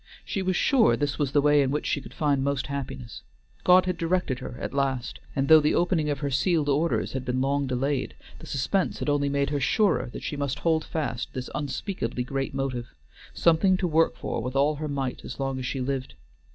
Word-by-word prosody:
She 195 - -2
was 185 -1 0
sure 250 +1 +4
this 145 0 -2
was 140 -3 0
the 145 0 +3
way 145 0 +5
in 135 - +1
which 150 +2 -1
she 145 - 0
could - - -12
find 145 -3 +1
most 140 -1 0
happiness. 135 - -6 0.4
God 185 0 +6
had 180 -1 -1
directed 165 -6 0
her 125 - -7
at - - -4
last, 135 -3 -1 0.2
and 135 0 +1
though 160 +1 +9
the 150 0 +2
opening 170 -4 +1
of 145 -2 -2
her 140 - -1
sealed 150 +2 +1
orders 155 +4 +1
had 130 -1 -3
been 125 0 -1
long 140 +1 +1
delayed, 130 +1 -1 0.2
the - - -11
suspense 160 +8 0
had - - -2
only 145 -1 +1
made 140 0 0
her 145 - 0
surer 190 - +2
that - - -8
she - - -3
must 140 -2 -2
hold 160 -2 +1
fast 130 -7 -3
this 130 -1 -5
unspeakably 135 - -3
great 135 +1 -3
motive: 130 - -3 0.4
something 180 +3 +4
to 180 - 0
work 160 -5 +2
for - - -3
with 125 +3 -4
all 145 +2 +2
her 155 +1 -3
might 135 -3 -3
as 130 - -8
long 135 -1 -2
as 125 - -3
she 135 - -3
lived. 130 - -3
140 Hz, 220 wpm, -26 LUFS, 130-155 Hz, 0.4 s, though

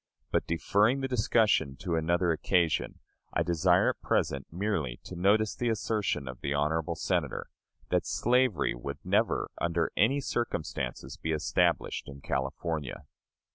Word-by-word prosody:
But, - - +1
deferring 105 +10 +2
the 135 - -1
discussion 110 - +2
to 85 +4 -4
another 85 +2 +2
occasion, 85 0 +1 0.4
I - - +2
desire 85 +2 +3
at - - -13
present 70 0 0
merely 80 - -2
to 90 - -8
notice 100 +4 +3
the 120 - -1
assertion 105 - -1
of 65 -1 -7
the 70 +1 -1
honorable 75 +2 0
Senator, - - -2 0.4
that - - +1
slavery 125 - +2
would - - -6
never - - +1
under 85 -1 +1
any 130 +7 +3
circumstances 120 - -3
be 80 - -3
established 75 -1 0
in 70 0 -10
California. 70 +2 -3
85 Hz, 135 wpm, -29 LUFS, 75-110 Hz, 0.4 s, desire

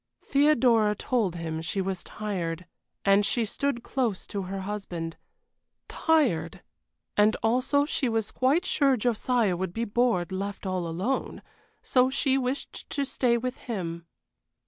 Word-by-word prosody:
Theodora 245 -7 +4
told 210 -5 0
him 160 -1 -4
she 165 +5 -3
was 190 -1 -2
tired, 180 -5 -4 0.4
and 200 +1 +5
she 230 +2 +1
stood 240 +2 -2
close 240 -8 -1
to 200 - -4
her 190 +1 -4
husband; 185 -5 -5 0.7
tired 195 - +1 0.5
and 210 +1 +4
also 255 +5 +2
she 270 -3 0
was 225 -2 -1
quite 285 +8 +2
sure 275 -3 +3
Josiah 235 -3 +1
would 180 0 -3
be 230 +1 -1
bored 220 -6 +1
left 200 +2 -4
all 185 -2 -1
alone, 185 +11 -2 0.4
so 255 0 +3
she 270 0 +1
wished 265 +1 -3
to 280 - -1
stay 245 -3 +1
with 255 +2 -3
him. 170 -7 -5
215 Hz, 140 wpm, -27 LUFS, 185-255 Hz, 0.7 s, and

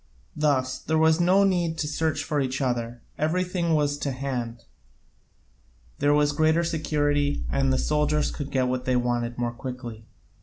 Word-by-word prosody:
Thus 135 -4 +1
there 160 - -1
was 160 +1 +4
no 185 +3 +4
need 175 -4 +1
to 155 - -1
search 155 -1 -1
for 145 0 -1
each 135 0 -2
other, 120 -3 -2 0.2
everything 170 +1 0
was 145 -1 +1
to 145 - -2
hand, 125 -3 -4 1.4
there 145 - +3
was 145 0 +3
greater 160 +3 +2
security, 145 -3 0
and 135 -1 +1
the 130 - +2
soldiers 150 +1 +1
could 145 -2 -5
get 130 -2 +1
what 125 0 -2
they 130 - +1
wanted 120 -1 -1
more 120 -1 -1
quickly. 120 -3 -7
145 Hz, 160 wpm, -25 LUFS, 125-155 Hz, 1.4 s, was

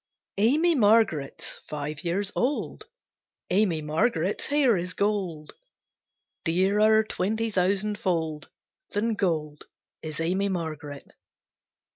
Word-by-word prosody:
AMY 300 +11 +4
MARGARET'S 210 - +2
five 150 0 -5
years 190 +4 -1
old, 290 - -1 0.7
Amy 180 -5 +2
Margaret's 165 +4 0
hair 280 -5 +3
is 180 0 -4
gold, 190 -7 -2 0.9
Dearer 205 +6 +3
twenty 220 +2 -2
thousand 200 +2 0
fold 160 -5 -2 0.4
Than 220 +3 0
gold, 155 -7 -2 0.4
is 155 -1 -6
Amy 185 +5 0
Margaret. 155 -5 -5
190 Hz, 95 wpm, -26 LUFS, 160-215 Hz, 0.9 s, AMY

